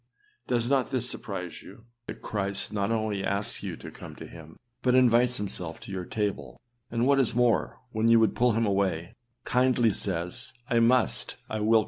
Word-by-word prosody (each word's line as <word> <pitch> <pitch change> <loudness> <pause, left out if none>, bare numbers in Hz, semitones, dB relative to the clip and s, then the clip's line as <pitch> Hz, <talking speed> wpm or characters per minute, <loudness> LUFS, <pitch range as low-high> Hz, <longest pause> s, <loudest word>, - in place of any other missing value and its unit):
â 420 0 -40
Does 120 -1 +1
not 135 -1 +2
this 125 -3 -1
surprise - - -5
you, 115 - -14 0.2
that - - -8
Christ 100 -1 -1
not 100 0 0
only 110 -3 -1
asks 100 +1 -1
you - - -5
to - - -9
come - - -10
to - - -9
him, 80 -1 -12 0.2
but 125 -1 +3
invites 125 0 +4
himself 90 -5 -3
to - - -9
your 95 -2 -4
table, 105 0 -3 0.3
and 115 +1 0
what 140 0 +4
is 125 -4 +3
more, 120 -1 +2
when 110 0 +1
you 115 0 +6
would 110 - +2
put 120 -2 +3
him 115 0 +2
away, 95 -5 0 0.3
kindly 125 -3 +3
says, 90 +6 -3 0.2
âI 115 -1 +4
must, 125 0 +2 0.2
I 110 - -1
will 105 +1 0
come 115 - +6
in. - - +8
115 Hz, 200 wpm, -28 LUFS, 100-125 Hz, 0.3 s, in